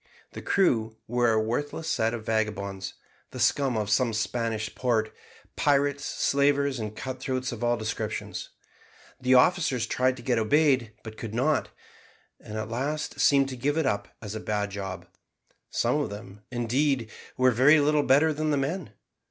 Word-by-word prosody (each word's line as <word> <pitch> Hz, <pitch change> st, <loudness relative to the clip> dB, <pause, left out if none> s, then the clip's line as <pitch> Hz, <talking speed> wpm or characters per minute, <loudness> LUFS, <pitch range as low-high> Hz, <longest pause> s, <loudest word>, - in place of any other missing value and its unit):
The -, -, -8 dB
crew 115 Hz, -, +1 dB
were 120 Hz, 0 st, +2 dB
a 110 Hz, -, +3 dB
worthless 145 Hz, +8 st, -2 dB
set 115 Hz, +1 st, +1 dB
of 110 Hz, -2 st, -8 dB
vagabonds, 100 Hz, -3 st, -2 dB, 0.3 s
the -, -, -9 dB
scum 135 Hz, -5 st, +2 dB
of 105 Hz, -1 st, -2 dB
some 115 Hz, +2 st, +2 dB
Spanish 110 Hz, 0 st, -2 dB
port, 115 Hz, -4 st, 0 dB, 0.4 s
pirates, 145 Hz, -1 st, +2 dB
slavers, 140 Hz, -1 st, +1 dB
and 110 Hz, -1 st, -5 dB
cut 130 Hz, +2 st, -5 dB
throats 130 Hz, -1 st, -2 dB
of 120 Hz, 0 st, -6 dB
all 120 Hz, 0 st, +2 dB
descriptions. 110 Hz, -1 st, -4 dB, 0.7 s
The 130 Hz, 0 st, +3 dB
officers 130 Hz, -4 st, +3 dB
tried 130 Hz, +2 st, +1 dB
to 120 Hz, -, -11 dB
get 120 Hz, -2 st, +1 dB
obeyed 130 Hz, -1 st, +3 dB
but 110 Hz, -1 st, -9 dB
could 110 Hz, -1 st, -6 dB
not, 145 Hz, +5 st, +1 dB, 0.7 s
and 110 Hz, -, -8 dB
at 110 Hz, 0 st, -3 dB
last 140 Hz, +7 st, -3 dB
seemed 140 Hz, -1 st, +4 dB
to 130 Hz, -, -5 dB
give 145 Hz, +5 st, -1 dB
it 160 Hz, -, +1 dB
up 100 Hz, -5 st, 0 dB, 0.2 s
as 105 Hz, -1 st, -5 dB
a 110 Hz, -, -4 dB
bad 105 Hz, -1 st, -2 dB
job; 95 Hz, -2 st, -6 dB, 0.6 s
some 125 Hz, +5 st, +1 dB
of 145 Hz, -, -1 dB
them, 105 Hz, 0 st, -10 dB
indeed, 125 Hz, 0 st, 0 dB, 0.3 s
were 130 Hz, 0 st, +4 dB
very 135 Hz, +7 st, +6 dB
little 150 Hz, +1 st, +3 dB
better 145 Hz, +3 st, +4 dB
than 155 Hz, +1 st, -1 dB
the 145 Hz, -, +2 dB
men. 140 Hz, -, -3 dB
125 Hz, 170 wpm, -27 LUFS, 110-140 Hz, 0.7 s, very